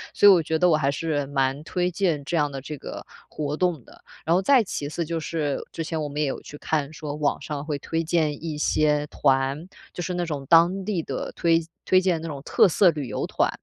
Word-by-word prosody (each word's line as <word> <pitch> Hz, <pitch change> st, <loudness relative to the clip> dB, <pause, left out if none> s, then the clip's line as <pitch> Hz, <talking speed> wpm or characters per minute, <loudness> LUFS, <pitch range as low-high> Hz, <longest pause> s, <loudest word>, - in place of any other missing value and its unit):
所 205 Hz, -, +6 dB
以 -, -, +11 dB
我 180 Hz, -3 st, +5 dB
觉 160 Hz, +1 st, 0 dB
得 180 Hz, -, +4 dB
我 155 Hz, -, +4 dB
还 140 Hz, -2 st, +1 dB
是 145 Hz, -1 st, -1 dB
蛮 135 Hz, +1 st, 0 dB
推 180 Hz, +3 st, -1 dB
荐 170 Hz, -6 st, 0 dB
这 170 Hz, -, -2 dB
样 145 Hz, -1 st, +1 dB
的 135 Hz, -, -5 dB
这 150 Hz, +3 st, -7 dB
个 -, -, -8 dB, 0.2 s
活 150 Hz, -1 st, -3 dB
动 170 Hz, -5 st, 0 dB
的。 -, -, -18 dB, 0.2 s
然 165 Hz, +3 st, +3 dB
后 185 Hz, -, +3 dB
再 255 Hz, +3 st, +5 dB
其 145 Hz, -7 st, -4 dB
次 165 Hz, +2 st, -3 dB
就 165 Hz, +1 st, -2 dB
是 155 Hz, -3 st, -2 dB
之 165 Hz, -, -4 dB
前 160 Hz, 0 st, -3 dB
我 150 Hz, -, -3 dB
们 145 Hz, +1 st, -3 dB
也 150 Hz, -, +1 dB
有 135 Hz, -, -4 dB
去 145 Hz, -, -10 dB
看， 150 Hz, -1 st, -1 dB
说 155 Hz, -2 st, -6 dB
网 150 Hz, -1 st, 0 dB
上 145 Hz, -2 st, -5 dB
会 150 Hz, -2 st, -2 dB
推 165 Hz, +3 st, -2 dB
荐 155 Hz, -3 st, 0 dB
一 160 Hz, -2 st, -4 dB
些 150 Hz, -1 st, +1 dB
团， 135 Hz, +4 st, +1 dB, 0.3 s
就 175 Hz, -, -5 dB
是 180 Hz, -, -3 dB
那 175 Hz, 0 st, -1 dB
种 145 Hz, -4 st, -4 dB
当 175 Hz, +4 st, +5 dB
地 200 Hz, -6 st, -1 dB
的 135 Hz, -, -4 dB
推 165 Hz, -1 st, +3 dB, 0.3 s
推 185 Hz, 0 st, +4 dB
荐 180 Hz, -4 st, +1 dB
的 165 Hz, -, -5 dB
那 160 Hz, -, -4 dB
种 140 Hz, -, -8 dB
特 -, -, +4 dB
色 185 Hz, +2 st, +4 dB
旅 145 Hz, -4 st, -5 dB
游 -, -, -3 dB
团。 -, -, +1 dB
155 Hz, 270 characters per minute, -24 LUFS, 145-170 Hz, 0.3 s, 以